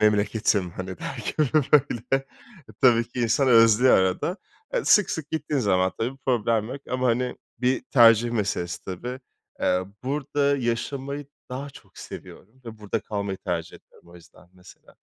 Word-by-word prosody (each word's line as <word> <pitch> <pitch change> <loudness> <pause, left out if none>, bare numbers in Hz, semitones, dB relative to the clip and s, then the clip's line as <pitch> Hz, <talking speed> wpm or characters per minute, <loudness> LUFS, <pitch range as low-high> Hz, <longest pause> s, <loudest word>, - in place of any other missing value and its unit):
memleketim 105 -3 +2
hani 95 0 -7
derken 155 - -2 0.3
böyle. 135 -1 +2 0.5
Tabii 120 -3 +4
ki 120 0 -5
insan 120 +4 +2
özlüyor 115 +1 +6
arada. 95 - 0 0.4
Eee, - - 0
sık 210 -4 +5
sık 155 -2 -5
gittiğin 150 -3 -1
zaman 95 -4 +2
tabii 120 +4 -1
bir - - -16
problem 115 -3 +1
yok 135 +3 -6
ama 130 0 0
hani, 125 +1 0 0.2
bir 125 +2 +1
tercih 115 -2 +5
meselesi 95 -6 -2
tabii. 120 +8 -6 0.4
Eee, 90 0 +1 0.2
burada 140 +1 0
yaşamayı 135 +4 -3 0.2
daha 135 +3 -6
çok - - -17
seviyorum 115 +7 -11
ve 115 -2 -9
burada 105 +1 -3
kalmayı 100 -2 -4
tercih 85 -3 -4
ediyorum - - -23
o 85 - -16
yüzden 85 0 -18
mesela. 90 -1 -18
115 Hz, 150 wpm, -25 LUFS, 100-135 Hz, 0.5 s, özlüyor